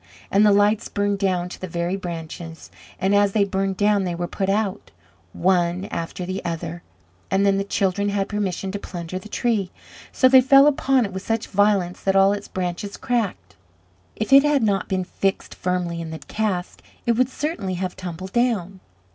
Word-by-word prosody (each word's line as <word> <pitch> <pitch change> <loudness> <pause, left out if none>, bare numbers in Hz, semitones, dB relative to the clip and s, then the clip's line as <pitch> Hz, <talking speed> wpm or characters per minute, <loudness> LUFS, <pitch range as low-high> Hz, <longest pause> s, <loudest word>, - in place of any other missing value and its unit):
And 200 +2 +4
the 210 - +6
lights 205 +1 +3
burned 205 0 -1
down 185 -3 0
to - - -10
the 185 - -4
very 170 +2 -2
branches, 165 -2 -7 0.3
and 190 +1 +1
as 205 -1 +3
they 210 - +3
burned 195 -1 -1
down 205 -1 +3
they 175 -2 -2
were 175 +1 -2
put 195 +2 -2
out, 205 0 -1 0.4
one 180 - +1
after 170 +2 -4
the 185 +1 -4
other, 170 0 -4 0.5
and 195 +1 +2
then 195 0 +3
the - - 0
children 200 0 0
had 200 -1 -1
permission 195 -2 -2
to 205 - -4
plunder 175 -1 -6
the 215 - -12
tree. 215 -5 0 0.4
So 255 - +4
they 260 0 +7
fell 275 +2 +7
upon 270 -3 +3
it 200 - -6
with 190 - -4
such 225 +2 -1
violence 200 -3 +1
that 195 0 +1
all 195 +1 +5
its 205 0 -5
branches 185 +2 -4
cracked; 200 - -2 0.6
if 220 +5 -1
it 275 - +10
had 295 -3 +2
not 200 -3 0
been 190 -2 0
fixed 195 +1 -2
firmly 180 -2 -2
in 165 - -6
the 160 - -6
cask, 185 +4 -3 0.2
it 235 - +3
would 250 +2 +2
certainly 265 - -3
have 185 0 -3
tumbled 185 0 -7
down. 210 -6 0
195 Hz, 190 wpm, -22 LUFS, 180-210 Hz, 0.6 s, it